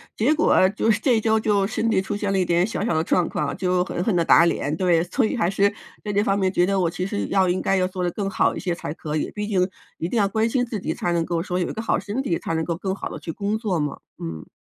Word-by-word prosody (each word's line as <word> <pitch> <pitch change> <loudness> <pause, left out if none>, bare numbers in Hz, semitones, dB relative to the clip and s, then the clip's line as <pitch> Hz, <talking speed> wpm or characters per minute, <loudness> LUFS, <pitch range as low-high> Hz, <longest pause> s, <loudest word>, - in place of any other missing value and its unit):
结 260 +8 +3
果 295 -11 +4
就 215 +3 -1
是 215 0 +3
这 245 -5 +3
一 - - 0
周 220 0 +2
就 200 -2 +1
身 225 +1 -1
体 190 - +2
出 205 +2 -4
现 205 -1 -2
了 195 - +1
一 180 - +2
点 175 +1 +2
小 215 -2 -3
小 200 - 0
的 160 0 +1
状 175 0 +1
况， 145 -1 -2
就 180 -1 +1
狠 175 - -4
狠 200 -4 +1
地 170 - +3
打 170 - +6
脸。 150 -3 0
对， 175 -3 +3
所 220 +8 0
以 220 - -1
还 185 -7 +1
是 200 +1 +3 0.3
在 210 - -3
这 205 +1 +2
方 195 -1 +1
面 190 -1 +1
觉 175 -2 +3
得 195 0 +1
我 170 -2 +2
其 180 +2 -3
实 205 +1 -2
要 190 -2 +2
应 180 - 0
该 195 - +1
要 185 -1 +2
做 185 -1 -4
的 175 - 0
更 195 0 -3
好 - - +1
一 - - -4
些 180 -2 -1
才 160 - -5
可 155 -2 -5
以， - - -2
毕 210 0 -3
竟 185 -3 +2 0.3
一 165 - -2
定 230 - -2
要 200 -2 +3
关 220 +3 0
心 245 0 +1
自 225 -4 -4
己， 160 - -2
才 175 - -2
能 170 -1 +1
够 170 -1 -1
说 180 -1 -2
有 175 - 0
一 - - -4
个 220 - -4
好 225 - 0
身 205 +7 -3
体， 175 -11 -1
才 - - -3
能 160 0 0
够 170 +1 -2
更 190 0 -2
好 - - -5
的 - - -7
去 165 - -5
工 205 +5 -2
作 195 -7 -1
嘛， 145 -1 -2 0.2
嗯。 80 -1 -6
190 Hz, 340 characters per minute, -23 LUFS, 175-210 Hz, 0.3 s, 打